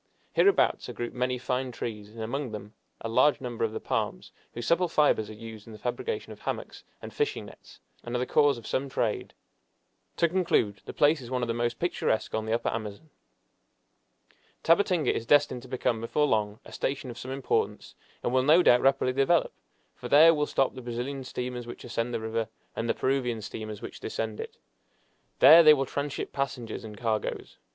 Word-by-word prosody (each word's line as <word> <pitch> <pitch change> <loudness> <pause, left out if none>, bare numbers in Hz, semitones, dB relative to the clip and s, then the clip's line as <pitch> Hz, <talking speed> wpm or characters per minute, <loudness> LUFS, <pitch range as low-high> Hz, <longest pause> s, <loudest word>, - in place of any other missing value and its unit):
Hereabouts 400 - +3
are - - -5
grouped 120 0 -5
many 125 0 -1
fine 125 +1 -2
trees, 105 -3 -6
and 115 +1 -10
among 135 +4 -3
them 105 0 -8 0.3
a - - -3
large 130 +6 +3
number 120 -4 -4
of 110 - +1
the - - -4
palms, - - -3 0.2
whose 120 0 -4
supple 175 +7 +3
fibers 145 -9 +2
are - - -7
used 110 -1 -10
in 115 - -10
the - - -9
fabrication 415 - -4
of - - -15
hammocks - - -5 0.2
and - - -8
fishing 440 -1 -1
nets, - - -15 0.2
and 120 +1 -5
are - - +2
the 125 - -1
cause 145 -1 +3
of 115 - -11
some 135 +1 -2
trade. 115 -4 -2 0.8
To 170 - +4
conclude, 165 - +1
the - - -6
place 150 0 +3
is 120 - -9
one 125 -1 -1
of - - -1
the 115 - 0
most 120 0 -1
picturesque 170 -9 -1
on 110 0 -2
the - - -2
Upper 115 - 0
Amazon. 110 +7 -6 1.5
Tabatinga 170 -1 +3
is 115 - -4
destined 145 -4 +3
to 130 - -12
become 120 -3 -1
before 150 +6 +1
long 105 -5 0
a - - -12
station 135 -2 -3
of 120 - -10
some 130 - -7
importance, 135 0 -2 0.3
and 120 - -1
will 130 - +4
no 155 +7 +5
doubt 120 -5 +6
rapidly 135 -1 +2
develop, 135 +6 +2 0.4
for - - -8
there 160 +3 +8
will 150 -1 0
stop 135 - +1
the 130 - -8
Brazilian 125 +3 -4
steamers 125 -1 -5
which 120 - -9
ascend 115 +1 -2
the 115 - -2
river, 110 0 -2 0.3
and 115 - -2
the - - +2
Peruvian 130 -4 0
steamers 110 0 -7
which - - -8
descend 110 -1 -4
it. - - -7 0.8
There 160 +4 +9
they 155 -2 +8
will 135 -1 -1
tranship 140 +2 -4
passengers 135 -5 -4
and 105 -2 -9
cargoes. 110 -2 -3
125 Hz, 200 wpm, -28 LUFS, 115-140 Hz, 1.5 s, There